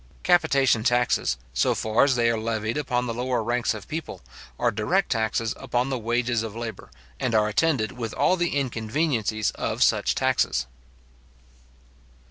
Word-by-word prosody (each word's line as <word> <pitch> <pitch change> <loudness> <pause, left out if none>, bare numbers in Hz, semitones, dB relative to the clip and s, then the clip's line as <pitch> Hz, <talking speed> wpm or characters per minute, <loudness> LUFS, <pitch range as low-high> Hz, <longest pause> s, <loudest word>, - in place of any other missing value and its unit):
Capitation 140 -10 +3
taxes, 120 - +1 0.2
so 65 - +2
far 110 +3 +2
as 135 -2 +2
they 120 -1 +2
are 115 - -1
levied 110 0 -2
upon 125 -4 -1
the 115 - -3
lower 125 0 -1
ranks 120 0 0
of 105 - -9
people, 155 - -6 0.4
are - - +1
direct - - 0
taxes 110 0 0
upon 125 0 -1
the 130 - -1
wages 120 0 0
of 110 -1 -6
labour, 115 - -6 0.3
and 120 -3 0
are 105 -1 +4
attended 120 0 +1
with 115 -3 -5
all 185 - +3
the 175 -5 -1
inconveniencies 115 -3 -1
of - - -1
such - - +2
taxes. 60 0 +1
120 Hz, 155 wpm, -25 LUFS, 110-130 Hz, 0.4 s, are